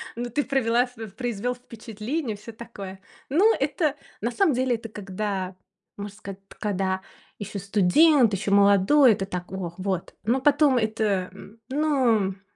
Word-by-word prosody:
Ну 240 +1 -4
ты 290 +5 0
провела 245 -2 +2
в 245 0 -18 0.2
произвёл 245 0 -2
впечатление, 230 +2 -5
всё 215 +3 -10
такое. 200 -4 -9 0.3
Ну, 400 +11 +4
это, 305 -5 0 0.3
на 235 +3 -1
самом 330 0 +2
деле, 255 0 +1
это 225 0 -8
когда 195 -2 -4 0.4
можно 205 0 -7
сказать, 195 -1 -10
т - - -16
когда 190 -2 -1 0.4
ещё 205 0 -5
студент, 215 - +4
ещё 200 +1 -2
молодой, 200 +7 +6
это 195 - -3
так: 180 -1 -6
"Ох, 180 -2 -5
вот", 185 -2 -3
но 235 +5 +1
потом 285 -2 +4
это, 215 -4 0
м. 205 +3 -14
Ну 285 -2 +1
м 195 -1 -3
215 Hz, 160 wpm, -25 LUFS, 195-250 Hz, 0.4 s, молодой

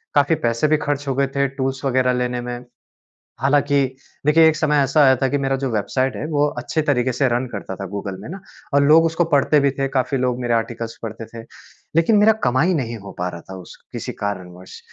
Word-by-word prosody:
काफ़ी 145 +3 +4
पैसे 115 +6 +1
भी 155 0 +3
खर्च 145 -1 -3
हो 135 - 0
गए 140 0 +1
थे 140 0 +2
टूल्स 135 0 -4
वगैरह 130 -1 +2
लेने 125 0 -1
में, 120 0 -6 0.7
हालाँकि 140 0 +2 0.4
देखिए, 160 +2 +6
एक 160 - +3
समय 150 -1 +1
ऐसा 140 +3 +2
आया 130 -1 +6
था 135 +1 0
कि 145 - 0
मेरा 135 -1 0
जो 135 -1 -2
वेबसाइट 130 +5 -1
है, - - -4
वो 145 -2 +1
अच्छे 160 - -1
तरीके 130 -4 +1
से 130 +2 +1
रन 120 +2 0
करता 100 -2 -6
था 95 - -6
गूगल 100 0 -5
में 105 - -9
ना 190 +4 -7 0.3
और 140 - +5
लोग 160 +3 +6
उसको 165 +1 +1
पढ़ते 145 +1 +4
भी 140 0 +2
थे, 135 0 -2
काफ़ी 130 0 -1
लोग 125 -1 -1
मेरे 120 -1 0
आर्टिकल्स 115 0 -3
पढ़ते 110 0 -6
थे। 115 - -8 0.5
लेकिन 185 +6 +4
मेरा 210 +2 +6
कमाई 130 +9 +2
नहीं 120 -6 -2
हो 100 - -8
पा 90 - -1
रहा 85 -1 -9
था 95 - -10
उस 90 - -12 0.2
किसी - - -5
कारणवश 95 -3 -6
130 Hz, 225 wpm, -20 LUFS, 120-145 Hz, 0.7 s, देखिए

